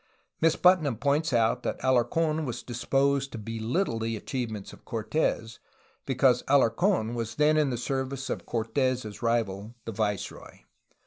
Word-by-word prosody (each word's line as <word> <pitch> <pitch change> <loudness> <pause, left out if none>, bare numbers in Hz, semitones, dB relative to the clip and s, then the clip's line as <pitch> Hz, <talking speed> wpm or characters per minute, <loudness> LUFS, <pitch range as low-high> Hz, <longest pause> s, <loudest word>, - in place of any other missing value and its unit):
Miss 165 0 +4
Putnam 175 -8 +4
points 145 +6 +1
out 115 0 +2
that - - -3
Alarc6n 155 +5 +2
was 120 -4 -4
disposed 135 +3 0
to - - -4
belittle 115 - -2
the 115 0 -2
achievements 110 -4 -5
of - - -15
Cortes, 115 0 -2 0.5
because 130 -1 +3
Alarc6n 135 - +3
was 115 -2 -4
then 150 +1 +4
in 150 -2 +3
the 125 - -2
service 135 +1 -3
of - - -4
Cortes' 115 -2 -1
rival, 115 -2 -1
the - - -4
viceroy. 105 -2 -4
125 Hz, 140 wpm, -28 LUFS, 115-140 Hz, 0.5 s, Miss